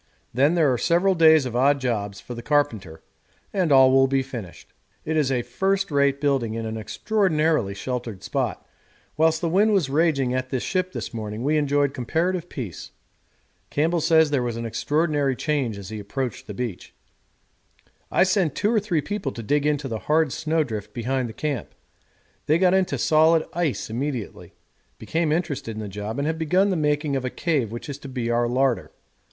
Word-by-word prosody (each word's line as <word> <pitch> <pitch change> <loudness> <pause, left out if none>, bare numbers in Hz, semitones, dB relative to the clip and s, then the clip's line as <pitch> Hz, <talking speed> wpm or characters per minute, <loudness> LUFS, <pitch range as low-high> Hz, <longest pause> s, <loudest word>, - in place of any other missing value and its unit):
Then 140 +7 +3
there 155 -6 +3
are 120 - -2
several 180 +3 +3
days 160 -4 +5
of 120 -2 -4
odd 140 +3 +3
jobs 105 -6 -2
for 120 - -8
the 120 - -7
carpenter, 115 - -1 0.5
and 185 -6 +1
all 135 -1 +7
will 135 0 +5
be 135 0 +1
finished. 120 -9 -9 0.3
It 160 - -1
is 145 -4 +2
a 125 -2 0
first 195 +10 -1
rate 140 -1 +2
building 135 -6 0
in 115 0 -4
an 110 0 -4
extraordinarily 155 - 0
sheltered 120 -3 -5
spot; 115 0 -3 0.5
whilst 160 +1 +2
the 170 - 0
wind 205 +6 +3
was 170 -9 +1
raging 140 -5 +2
at 130 0 -2
the 130 - -1
ship 185 +6 -1
this - - -6
morning 110 0 -5
we 150 +3 +1
enjoyed 145 -2 +1
comparative 170 +7 -1
peace. 110 - -7 0.8
Campbell 165 +3 +1
says 160 -2 +4
there 140 -3 +2
was 120 -2 -3
an 115 - -4
extraordinary 145 +4 0
change 135 -7 -1
as 100 -1 -8
he 110 -1 -6
approached 125 +4 -4
the 105 - -7
beach. 120 -6 -5 1.1
I - - +4
sent 185 -5 +1
two 210 +3 +1
or 220 - +4
three 185 -7 -1
people 195 -3 -3
to 115 - -7
dig 145 +6 +1
into 145 -2 0
the 115 -3 -4
hard 155 -2 +3
snow 160 +1 0
drift 105 -5 -6
behind 125 +1 -1
the - - -8
camp; 145 -4 -4 0.7
they 155 +2 +4
got 180 +1 +3
into 190 -1 +1
solid 160 +1 +4
ice 170 -5 -1
immediately, 125 0 -5 0.4
became 160 -1 -1
interested 145 -9 -2
in - - -6
the 105 - -5
job, 105 +4 -5
and 140 - -1
have 160 +1 -2
begun 185 +5 +2
the - - +1
making 150 -2 0
of 135 - -1
a 130 - -1
cave 140 -8 -1
which 120 - -7
is 140 -1 -6
to 140 - -9
be 120 -3 -2
our 120 0 +2
larder. 125 -4 0
140 Hz, 190 wpm, -24 LUFS, 120-160 Hz, 1.1 s, all